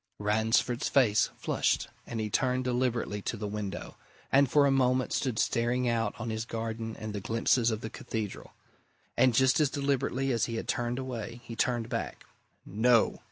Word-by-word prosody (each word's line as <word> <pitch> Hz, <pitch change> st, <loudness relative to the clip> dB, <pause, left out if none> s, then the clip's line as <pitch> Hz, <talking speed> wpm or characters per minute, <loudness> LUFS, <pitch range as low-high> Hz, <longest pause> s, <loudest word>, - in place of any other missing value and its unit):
Ransford's 110 Hz, +4 st, +1 dB
face 110 Hz, -7 st, +3 dB
flushed -, -, 0 dB, 0.2 s
and 115 Hz, -, -4 dB
he 110 Hz, -, -1 dB
turned 130 Hz, +2 st, +1 dB
deliberately 120 Hz, -4 st, -1 dB
to 115 Hz, -, -3 dB
the 105 Hz, -, -4 dB
window, 105 Hz, -1 st, -5 dB, 0.3 s
and 140 Hz, -1 st, +5 dB
for 145 Hz, +1 st, +5 dB
a 140 Hz, -, +3 dB
moment 130 Hz, -1 st, +2 dB
stood 125 Hz, -5 st, -1 dB
staring 120 Hz, +3 st, +1 dB
out 115 Hz, -3 st, 0 dB
on 115 Hz, 0 st, -3 dB
his 110 Hz, 0 st, -2 dB
garden 115 Hz, -1 st, -4 dB
and 110 Hz, -1 st, -6 dB
the 100 Hz, -, -4 dB
glimpses 115 Hz, +2 st, +2 dB
of 110 Hz, -1 st, -2 dB
the 110 Hz, -, -5 dB
Cathedral. 110 Hz, -3 st, -5 dB, 0.6 s
And 130 Hz, -3 st, +4 dB
just 130 Hz, +3 st, +4 dB
as 150 Hz, -3 st, +3 dB
deliberately 135 Hz, -1 st, 0 dB
as 115 Hz, -3 st, +1 dB
he 115 Hz, -, -4 dB
had 115 Hz, -, -4 dB
turned 120 Hz, -4 st, -1 dB
away, 120 Hz, -3 st, -5 dB
he 115 Hz, -, -8 dB
turned 120 Hz, 0 st, 0 dB
back. -, -, -4 dB, 0.4 s
"No!" 115 Hz, +3 st, +3 dB
120 Hz, 175 wpm, -29 LUFS, 110-130 Hz, 0.6 s, and